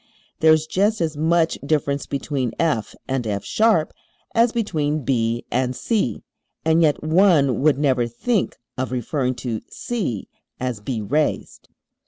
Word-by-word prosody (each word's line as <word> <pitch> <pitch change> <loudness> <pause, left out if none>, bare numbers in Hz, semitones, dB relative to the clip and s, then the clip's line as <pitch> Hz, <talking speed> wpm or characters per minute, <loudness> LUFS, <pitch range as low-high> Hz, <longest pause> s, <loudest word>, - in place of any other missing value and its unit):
There 160 0 +6
is 155 0 +4
just 205 +7 +1
as 160 -3 -1
much 165 +2 +2
difference 140 -1 0
between 135 -3 -2
F 135 -10 0
and 130 -2 -1
F[sharp] 155 - +1 0.4
as 230 0 +4
between 155 - -1
B 120 -2 0
and 125 +1 0
C, 210 - -1 0.4
and 160 +1 +4
yet 150 -3 +2
one 155 -6 +4
would 145 -1 +4
never 130 -4 +2
think 195 - -1 0.2
of 130 0 -2
referring 130 +1 -1
to 115 -3 -2
C 190 - -3 0.3
as 125 -4 -2
"B 110 +2 -3
raised"! 145 +9 -2
145 Hz, 140 wpm, -22 LUFS, 125-165 Hz, 0.4 s, There